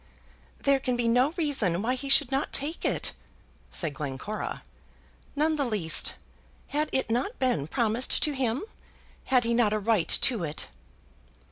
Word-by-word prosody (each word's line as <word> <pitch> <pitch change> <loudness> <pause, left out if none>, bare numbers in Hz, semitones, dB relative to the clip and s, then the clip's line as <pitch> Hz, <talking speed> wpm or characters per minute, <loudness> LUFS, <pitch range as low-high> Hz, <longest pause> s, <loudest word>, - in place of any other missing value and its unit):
"There 275 -1 +3
can 255 -1 -1
be 240 -1 0
no 250 +4 +3
reason 265 - +1
why 245 +3 +1
he 275 +2 -5
should 275 -1 +5
not 270 +2 0
take 300 +4 -1
it," - - 0 0.6
said 160 -4 +1
Glencora. 150 +8 -5 0.7
"None 310 +2 +1
the 285 - +1
least. 210 -10 +2 0.5
Had 300 +1 -1
it 265 -4 0
not 255 - -1
been 245 - 0
promised 235 +3 +1
to 300 - +2
him? 260 - -1 0.6
Had 255 -2 +3
he 235 0 0
not 230 -3 +3
a 215 - 0
right 210 -4 +1 0.2
to 230 -8 +3
it?" 155 -1 -5
245 Hz, 155 wpm, -27 LUFS, 215-275 Hz, 0.7 s, should